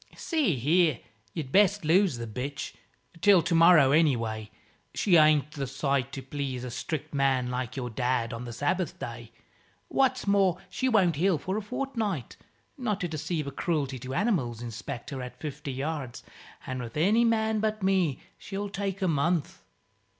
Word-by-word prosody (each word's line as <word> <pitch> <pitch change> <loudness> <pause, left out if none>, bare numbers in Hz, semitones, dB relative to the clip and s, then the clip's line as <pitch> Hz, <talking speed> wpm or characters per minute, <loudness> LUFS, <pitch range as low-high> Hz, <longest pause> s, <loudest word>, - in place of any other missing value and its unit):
"See 300 - +1
here, 155 +4 +2 0.4
you'd 140 -5 -4
best 205 -1 +4
lose 175 -3 +3
the 115 - -4
bitch 130 +6 -5 0.5
till 195 -5 +6
tomorrow, 165 -4 +6
anyway. 115 -9 +1 0.5
She 190 -4 +3
ain't 155 -2 +5
the 140 -3 -4
sight 135 0 -1
to 135 - -6
please 135 -4 -4
a 125 - -5
strict 150 +4 -4
man, 135 -3 +1
like 125 -2 -3
your 125 -3 -4
dad, 120 -1 0
on 115 +2 -6
the 120 - -6
Sabbath 145 +7 -1
day. 115 -1 -7 0.6
What's 260 -1 +1
more, 195 -3 +3
she 260 - 0
won't 185 - +3
heal 180 +1 +3
for 185 +6 -3
a 215 - -1
fortni't, 220 - -3 0.4
not 215 -5 -1
to 180 - 0
deceive 155 0 -3
a 140 - -5
Croolty 140 -3 -2
to 130 +1 -5
Animals 165 - 0
Inspector 120 +3 -6
at 125 0 -8
fifty 150 -2 -5
yards; 135 -2 -4 0.4
an' 130 -1 -4
with 115 +1 -7
any 205 +9 +4
man 220 -1 +2
but 215 -1 -1
me 185 -8 +1 0.2
she'll 200 +1 -5
take 195 0 -3
a - - +2
month." 160 - 0
155 Hz, 165 wpm, -28 LUFS, 130-195 Hz, 0.6 s, till